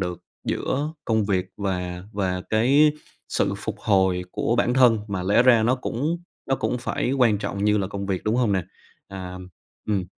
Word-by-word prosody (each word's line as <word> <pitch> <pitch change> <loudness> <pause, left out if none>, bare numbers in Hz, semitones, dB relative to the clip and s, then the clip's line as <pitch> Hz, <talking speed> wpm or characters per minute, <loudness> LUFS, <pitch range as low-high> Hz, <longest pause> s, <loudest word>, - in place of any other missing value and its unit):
được 90 -2 -3 0.3
giữa 145 +4 -1
công 110 -2 +1
việc 95 -2 0
và 90 -3 -3
và 95 -2 -1
cái 140 +7 +4 0.4
sự 100 - 0
phục 105 0 -5
hồi 95 -4 +2
của 120 - 0
bản 120 +1 +2
thân, 125 -4 +5
mà 100 -2 -2
lẽ 100 +6 +4
ra 120 -3 +5
nó 120 +3 +3
cũng 145 +6 -2 0.3
nó 135 - +2
cũng 125 - -1
phải 125 +1 -2
quan 120 -6 +3
trọng 100 -1 -3
như 105 0 +3
là 95 - 0
công 100 0 -5
việc, 95 -2 -2
đúng 110 +3 +1
hông 120 -5 +2
nè? 95 -2 +1 0.5
À, 95 -1 -7 0.5
ừm, 100 -4 0
105 Hz, 190 wpm, -24 LUFS, 95-125 Hz, 0.5 s, thân